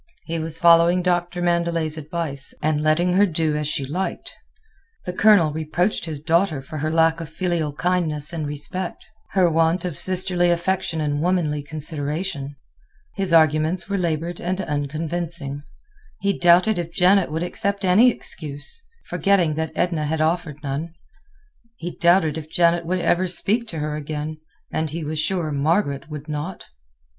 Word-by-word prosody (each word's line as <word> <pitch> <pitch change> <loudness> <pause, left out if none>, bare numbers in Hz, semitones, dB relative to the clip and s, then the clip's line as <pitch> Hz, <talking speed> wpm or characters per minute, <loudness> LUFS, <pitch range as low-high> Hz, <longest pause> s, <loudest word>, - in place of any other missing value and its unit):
He 165 0 -3
was 160 0 -2
following 170 +1 +5
Doctor 175 0 0
Mandelet's 170 -2 0
advice, 155 -3 -1
and 155 -1 0
letting 165 +4 +2
her 200 +2 +4
do 160 -3 0
as 150 -1 -1
she 140 -2 -1
liked. 180 +8 -4 0.7
The 180 - -4
Colonel 180 -6 +5
reproached 160 +6 -1
his 155 -3 -5
daughter 165 0 +1
for 145 +3 -7
her 155 +2 -1
lack 165 +1 +2
of 160 - -7
filial 165 -2 -1
kindness 165 -3 0
and 155 -3 -3
respect, 150 +5 -5 0.3
her 185 -2 +4
want 165 +2 +2
of 175 -4 -3
sisterly 180 +1 +3
affection 170 -1 0
and 145 -1 -1
womanly 165 -4 0
consideration. 150 0 -3 0.6
His 195 -3 -1
arguments 160 +3 +3
were 200 - 0
labored 170 0 -2
and 185 +2 -2
unconvincing. 155 -1 -3 0.6
He 200 -1 0
doubted 175 +3 +4
if 170 -1 -4
Janet 185 +1 +3
would 160 +2 -2
accept 200 +2 -2
any 205 +7 +6
excuse—forgetting 185 - -2
that 160 +1 -3
Edna 165 -4 0
had 160 +1 -1
offered 155 -2 -1
none. 150 +4 -4 0.8
He 175 +1 -6
doubted 170 -3 +3
if 155 0 -11
Janet 170 0 +2
would 185 +2 0
ever 185 +2 +2
speak 215 +6 0
to 165 - -5
her 150 0 -2
again, 150 +1 -5 0.3
and 160 0 -1
he 165 +2 -5
was 155 +1 -3
sure 170 -1 -1
Margaret 145 0 0
would 150 -1 -7
not. 155 +5 -5
165 Hz, 155 wpm, -22 LUFS, 155-180 Hz, 0.8 s, any